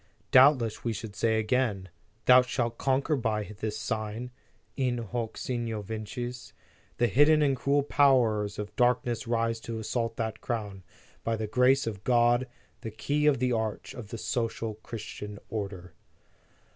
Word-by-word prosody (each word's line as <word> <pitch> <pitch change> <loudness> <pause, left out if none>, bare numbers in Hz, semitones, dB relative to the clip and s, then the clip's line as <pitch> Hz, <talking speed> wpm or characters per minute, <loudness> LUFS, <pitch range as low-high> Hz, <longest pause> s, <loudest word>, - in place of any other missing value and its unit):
Doubtless 130 -4 +5
we 115 - -1
should 110 -1 -7
again 110 -2 +1
say: 95 - -14 0.4
Thou 125 0 +8
shalt 120 -2 -2
conquer 135 +3 +1
by 110 -5 -1 0.2
this 110 0 -3
sign: 110 +2 -4 0.4
in 125 -3 0
hoc 115 0 -4
signo 115 -4 -3
vinces 120 +4 -6 0.4
The 120 - +3
hidden 145 +7 +5
and 140 -2 +2
cruel 140 +2 +1
powers 120 -8 +3
of 105 0 -6
darkness 120 -1 +1
rise 115 -1 0
to 115 0 -6
assault 115 +1 -2
that 110 -1 -3
Crown, 105 -5 -4 0.4
by 115 - 0
the 110 0 -3
grace 125 +5 +3
of 105 -4 -5
God, 120 +1 +3 0.3
the 115 - -5
key 145 +7 0
of 150 - +4
the 125 +1 0
arch 110 -2 -2
of 120 -5 -8
the 115 - -6
social 115 -1 -2
Christian 105 -1 -8
order." 95 -5 -5
115 Hz, 150 wpm, -28 LUFS, 110-125 Hz, 0.4 s, Thou